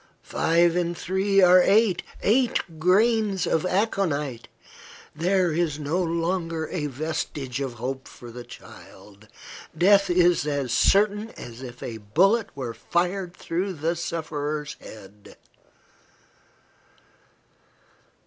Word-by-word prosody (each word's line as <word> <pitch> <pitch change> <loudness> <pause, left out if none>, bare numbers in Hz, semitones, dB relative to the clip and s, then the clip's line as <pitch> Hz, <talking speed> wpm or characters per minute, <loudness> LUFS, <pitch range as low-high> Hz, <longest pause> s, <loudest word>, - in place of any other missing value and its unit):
Five 170 +1 +2
and 175 -1 -1
three 195 +1 +1
are 180 0 +7
eight. 200 -1 +3 0.2
Eight 215 -8 +1
grains 200 +2 +2
of 160 +3 0
aconite! 160 - -1 0.7
There 180 +2 +1
is 160 -3 0
no 155 +5 -1
longer 165 -1 -2
a 150 -5 -2
vestige 140 -2 -4
of 135 -3 -3
hope 130 +3 -5
for 120 -1 -12
the 120 +1 -8
child. 105 -3 -15 0.5
Death 200 +2 +5
is 175 -3 +3
as 140 -4 -1
certain 210 - +3
as 120 +1 -9
if 125 -2 -9
a 115 -2 -5
bullet 195 - +2
were 125 -4 -5
fired 180 +4 -2
through 185 +3 -3
the 165 +1 -2
sufferer's 155 -3 -4
head." 105 -1 -13
170 Hz, 110 wpm, -25 LUFS, 140-190 Hz, 0.7 s, are